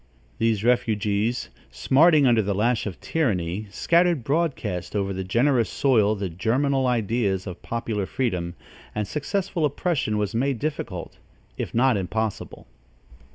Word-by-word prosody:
These 110 -2 +1
refugees, 110 - 0 0.2
smarting 145 - +4
under 120 -3 +4
the 100 -1 -1
lash 115 +2 +1
of 95 - -6
tyranny, 105 - -1
scattered 170 - +2
broadcast 130 - -1
over 100 -1 0
the 95 0 -3
generous 120 +5 +2
soil 110 -6 +2
the 100 -1 -3
germinal 130 - 0
ideas 110 -5 0
of 90 -2 -7
popular 110 -4 -3
freedom, 90 -9 -2 0.4
and 105 -1 -1
successful 180 +2 -2
oppression 145 - 0
was 105 0 -1
made 130 +3 0
difficult, 115 - -5 0.4
if - - -5
not 125 -1 +4
impossible. 110 +3 -3
115 Hz, 130 wpm, -24 LUFS, 100-135 Hz, 0.4 s, smarting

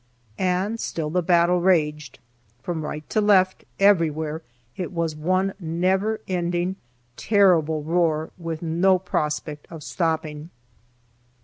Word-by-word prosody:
And 195 +5 -1
still 155 -7 -3
the 180 +2 +1
battle 175 +1 +3
raged. 150 -6 +1 0.5
From 165 0 -3
right 150 0 -6
to 215 - +2
left, 190 -3 +3
everywhere, 160 -5 +2 0.3
it 180 -1 -4
was 165 -3 -2
one 185 +5 0
never 190 +6 0
ending, 175 0 -1 0.4
terrible 170 -7 +3
roar, 160 -1 0
with 165 -2 -6
no 175 +4 +3
prospect 150 -4 -3
of 160 -3 -9
stopping. 160 -2 -2
170 Hz, 115 wpm, -23 LUFS, 155-185 Hz, 0.5 s, battle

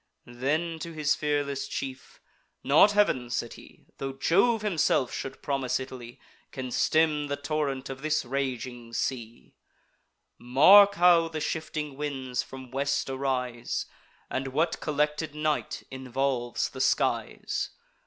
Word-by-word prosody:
Then, 155 +7 -2
to 165 +1 -6
his 150 -2 +1
fearless 145 -2 -1
chief: 135 -2 -6 0.4
"Not 155 +9 +6
Heav'n," 130 -13 +2
said 120 -1 -3
he, - - -16
"Tho' 135 0 -3
Jove 200 - +2
himself 165 -9 +1
should 135 0 -6
promise 135 -3 0
Italy, 125 -2 -9 0.3
Can 130 -2 -5
stem 155 +1 +2
the 140 - -1
torrent 145 -2 -2
of 135 0 -7
this 155 -2 0
raging 125 -2 -4
sea. 120 -2 -4 0.9
Mark 195 +12 +7
how 175 -2 +5
the 160 -1 -5
shifting 150 -2 -3
winds 135 -4 -2
from 130 -2 -10
west 140 0 -1
arise, 130 -3 -2 0.4
And 135 +1 -3
what 160 +5 0
collected 150 0 -1
night 150 -1 -1
involves 130 -1 -1
the 130 - -5
skies! 135 - 0
140 Hz, 125 wpm, -28 LUFS, 130-155 Hz, 0.9 s, Mark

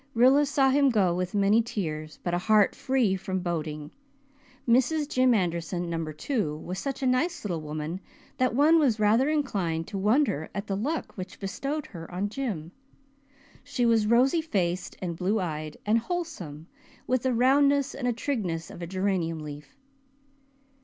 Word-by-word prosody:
Rilla 265 +5 +5
saw 275 -1 +3
him 280 0 +4
go 195 -7 +2
with 180 +2 -3
many 205 +3 +4
tears 155 -9 -4
but 175 - -2
a 175 - +1
heart 210 +2 +4
free 255 -7 +1
from 190 0 -3
boding. 155 -4 -4 0.8
Mrs. 265 +6 +3
Jim 255 -3 +3
Anderson, 175 -2 -1
Number 165 -2 -3
Two, 155 - -2
was 180 +4 -6
such 275 +2 -4
a - - +1
nice 275 +8 +1
little 170 -5 -2
woman 155 +3 -4 0.4
that 255 -2 +1
one 310 +4 +5
was 250 -8 +2
rather 225 +7 +3
inclined 195 - -1
to 195 - -4
wonder 210 - +1
at 200 0 -3
the 195 - -2
luck 285 +11 -3
which 185 -1 -8
bestowed 275 +10 -3
her 165 -4 -9
on 190 +3 -2
Jim. 205 - -4 0.9
She 245 -2 -1
was 225 -2 +3
rosy 255 +8 +4
faced 185 - -2
and 170 -2 -3
blue 195 +6 0
eyed 155 -4 -4
and 220 +2 +3
wholesome, 225 - -5 0.4
with 255 -1 +1
the 255 -1 0
roundness 280 +3 +3
and 255 -3 -3
trigness 190 - -2
of - - -10
a 170 - -4
geranium 185 -3 -1
leaf. 150 - -9
205 Hz, 165 wpm, -27 LUFS, 170-260 Hz, 0.9 s, Rilla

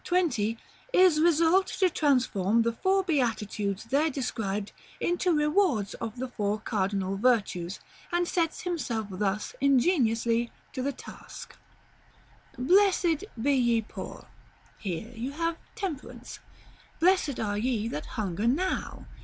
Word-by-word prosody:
20, 285 - +1 0.4
is 360 -5 +5
resolved 335 +3 +3
to 380 - +5
transform 240 - +2
the 230 - +1
four 380 +9 +2
Beatitudes 215 - -1
there 280 +7 +1
described 220 -7 -3 0.3
into 350 +1 +1
rewards 300 - +2
of 225 -2 -5
the 260 +2 -3
four 210 -3 -2
cardinal 195 -2 -1
Virtues, 200 -6 +1 0.3
and 350 0 +1
sets 335 -2 0
himself 270 -11 -2
thus 195 +2 -2
ingeniously 240 -5 +2 0.2
to 260 - -3
the 280 +2 0
task: - - -11 1.0
"'Blessed 355 +3 +3
be 280 +5 +2
ye 240 -3 +3
poor.' - - -8 0.5
Here 200 +4 -4
you 245 +5 -4
have 330 +1 -1 0.2
Temperance. 380 -11 -6 0.6
'Blessed 340 -5 +3
are 205 -1 -1
ye 230 -2 0
that 150 -9 -5
hunger 205 0 -1
now.' 355 +10 -1
250 Hz, 120 wpm, -28 LUFS, 215-330 Hz, 1.0 s, is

